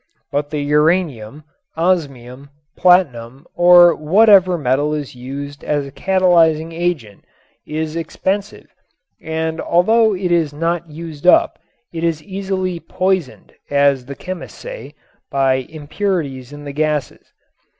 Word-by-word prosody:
But 145 0 -2
the 150 - -3
uranium, 150 -4 0 0.3
osmium, 140 -7 -2 0.3
platinum 140 -7 +2
or 175 -1 +7
whatever 185 +2 +4
metal 145 +1 0
is 145 -3 -6
used 140 +3 -8
as 145 -1 -1
a 140 - -10
catalyzing 165 -3 +2
agent 165 - -3 0.4
is 155 +1 -4
expensive 195 +5 -3 0.6
and 160 0 -3
although 220 +5 +3
it 180 -1 -2
is 165 -4 +1
not 165 +1 -2
used 160 0 -7
up - - +4 0.3
it 165 0 -5
is 165 -2 -1
easily 190 -2 -3
"poisoned," 185 -4 -2 0.2
as 140 -2 +2
the 140 - -7
chemists 185 +3 -8
say, - - -9 0.3
by 130 -1 0
impurities 150 -4 -4
in 145 0 -10
the 140 -1 -7
gases. 150 -3 -3
160 Hz, 120 wpm, -18 LUFS, 140-180 Hz, 0.6 s, or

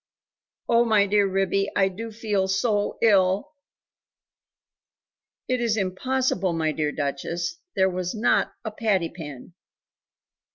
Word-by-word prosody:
Oh, 235 0 +4
my 215 -3 +4
dear 205 0 +3
Ribby, 195 +1 0
I 195 -1 +4
do 225 +4 -6
feel 210 -3 -1
so 205 +2 0
ill!" 200 +4 +3 2.0
"It 255 -1 0
is 225 -2 +1
impossible, 195 -1 0
my 160 -1 0
dear 150 -1 -1
Duchess; 155 - -3 0.2
there 190 0 +4
was 180 +1 -3
not 220 +2 +2
a 220 - -3
patty 210 -6 0
pan." 150 -2 -10
195 Hz, 120 wpm, -25 LUFS, 180-220 Hz, 2.0 s, Oh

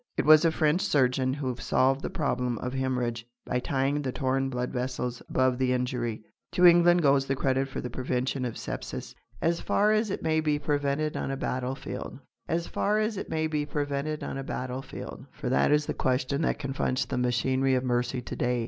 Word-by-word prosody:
It - - +1
was 155 0 +8
a 165 - +4
French 155 +3 +2
surgeon 130 -7 +2
who 130 -4 -2
solved 135 +2 +2
the - - -3
problem 125 -5 -1
of 125 +3 -4
hemorrhage 125 -3 -1 0.2
by 125 - 0
tying 135 +3 0
the 135 -2 -2
torn 135 +1 0
blood 125 -1 -2
vessels 125 -1 -3
above 130 -1 +2
the 130 -1 +2
injury. 125 -3 -2 0.3
To 180 - +4
England 175 0 +6
goes 140 -1 +4
the 135 - +1
credit 135 0 +1
for 135 - -5
the 125 - -4
prevention 130 +1 -1
of 120 -3 -3
sepsis, - - -6 0.3
as 170 0 +1
far 210 +1 +2
as 215 0 +2
it 195 - -3
may 160 -1 +2
be 150 -1 +1
prevented 145 +1 -1
on - - -2
a 135 - -2
battlefield. 130 0 -4 0.3
As 170 +1 0
far 210 +1 0
as 215 0 0
it 195 - -5
may 160 0 0
be 155 -2 0
prevented 145 +1 -2
on 135 - -4
a - - -4
battlefield! 130 0 -6
For - - -4
that 70 - +3
is 150 0 +3
the - - -2
question 130 +3 0
that - - +1
confronts 135 -2 -1
the - - -2
machinery 130 +2 +2
of 130 - 0
mercy 125 0 0
to - - -6
day. 125 0 0
135 Hz, 200 wpm, -28 LUFS, 125-150 Hz, 0.3 s, was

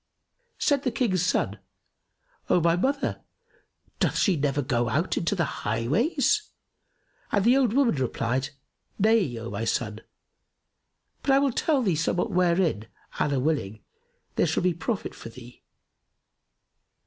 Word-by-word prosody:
Said 285 -2 +2
the 265 - 0
King's 220 - 0
son, 180 - 0 0.9
"O - - +4
my 170 0 +3
mother, 275 +10 -1 0.8
doth - - +1
she 195 - +3
never 145 -1 0
go 120 -3 0
out 155 +8 0
into 175 +4 0
the 170 -3 +1 0.2
highways?"; 230 - +1 0.8
and 200 -1 +1
the 245 +2 +6
old 255 -5 +2
woman 270 -2 +3
replied, 130 -1 -1 0.5
"Nay, 210 - +2
O 115 -1 -6
my 100 +2 -3
son; 110 -1 -2 1.2
but - - -4
I 270 - +6
will 275 -1 +2
tell 285 -1 +1
thee 190 -7 +1
somewhat 175 +6 0
wherein, 175 - +1 0.3
Allah 140 -2 +1
willing, 125 -8 -2 0.5
there - - +3
shall - - 0
be 180 -1 +2
profit 195 +5 -3
for - - -10
thee. 120 +1 -14
170 Hz, 135 wpm, -26 LUFS, -, 1.2 s, the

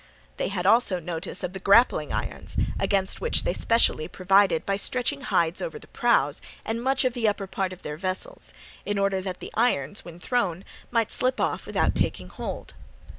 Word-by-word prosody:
They - - 0
had 185 -2 -3
also 205 -3 +4
notice 175 +3 -5
of 180 0 -3
the 190 - -5
grappling 200 +6 +4
irons, - - -4 0.2
against 195 -1 0
which 475 - +2
they - - 0
specially 230 -9 +2
provided 190 -2 +3
by 195 0 0
stretching 255 +6 -1
hides 170 -9 +1
over 485 -2 -4
the - - -12
prows - - +2 0.2
and 225 +1 -2
much 265 +2 +1
of 255 - +2
the 240 -3 +1
upper 205 -1 0
part 190 0 -2
of 185 - -11
their 150 0 -5
vessels, 185 - -4 0.3
in 205 0 -2
order 195 -1 +1
that 185 -1 -5
the - - -7
irons 205 - +1
when 170 -1 -10
thrown 190 -3 -1 0.2
might 230 -2 +1
slip 255 0 +1
off - - -1
without - - +1
taking - - -1
hold. - - -6
195 Hz, 185 wpm, -26 LUFS, 185-235 Hz, 0.3 s, also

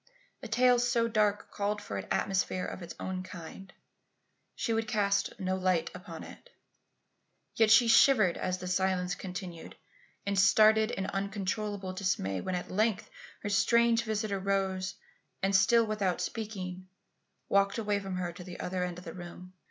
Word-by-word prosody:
A - - -6
tale 245 +2 +4
so 240 -1 +2
dark 210 -2 0
called 205 +1 -1
for 100 - -7
an 100 - -4
atmosphere 185 -1 0
of - - -6
its 170 - -8
own 185 -1 -3
kind. 185 +1 -10 0.8
She 235 -4 -1
would 225 0 -1
cast 200 -3 0
no 185 -1 -1
light 185 -2 0
upon - - -9
it. - - -13 1.1
Yet 225 -1 +4
she 230 +2 +7
shivered 225 -6 +5
as 185 0 -2
the 180 0 -7
silence 180 0 0
continued, 180 -3 -7 0.5
and 200 -1 0
started 215 +2 +5
in 195 -4 -3
uncontrollable 200 0 -3
dismay 185 - -1
when 185 - -2
at 180 - -5
length 215 - 0 0.3
her 205 - -2
strange 230 +3 +3
visitor 215 -3 -2
rose, 190 -1 -1 0.5
and 195 0 +2
still, 230 +4 +5
without 205 -4 -1
speaking, 185 -4 -5 0.6
walked 200 +1 +2
away 210 -2 0
from 195 -2 -5
her 180 -1 -3
to 180 - -10
the 175 -1 -9
other 180 0 -2
end 180 -1 -4
of 180 - -11
the - - -7
room. 180 0 -10
195 Hz, 160 wpm, -30 LUFS, 185-215 Hz, 1.1 s, she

